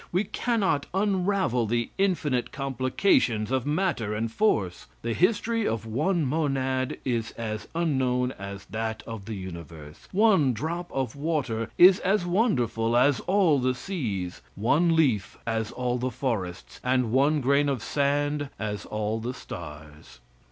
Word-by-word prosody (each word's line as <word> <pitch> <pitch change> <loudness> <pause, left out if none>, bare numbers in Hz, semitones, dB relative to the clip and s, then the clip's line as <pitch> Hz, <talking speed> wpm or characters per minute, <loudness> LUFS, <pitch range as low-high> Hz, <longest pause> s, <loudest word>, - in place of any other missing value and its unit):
We 180 +4 +2
cannot 210 - 0
unravel 190 - +1
the 120 +1 -1
infinite 155 -10 +1
complications 130 - +1
of 130 0 0
matter 150 - 0
and 110 +1 -2
force. 110 - 0 0.2
The 115 0 -1
history 220 - +1
of 115 -1 -2
one 155 - 0
monad 130 -3 0
is 120 -3 -1
as 110 -2 -5
unknown 130 -6 +1
as 100 -2 -8
that 110 0 -4
of 110 -4 -7
the 110 - -5
universe; 85 -5 -9
one 190 - +4
drop 170 +8 -4
of 130 -3 -2
water 140 -7 -1
is 185 +2 +8
as 190 -1 +1
wonderful 120 - +1
as 130 +2 +4
all 185 -7 +4
the 130 0 +1
seas; 110 - -4
one 160 - +3
leaf, 125 -12 +1
as 110 -1 -1
all 125 -1 -2
the 130 +1 -1
forests; 115 -8 -4
and 125 -2 +1
one 140 +4 +3
grain 140 +2 +2
of 130 -5 -2
sand, 145 +2 0
as 105 -2 -4
all 105 +1 -2
the 120 +3 -4
stars. 75 -4 -10
130 Hz, 145 wpm, -26 LUFS, 110-160 Hz, 0.2 s, is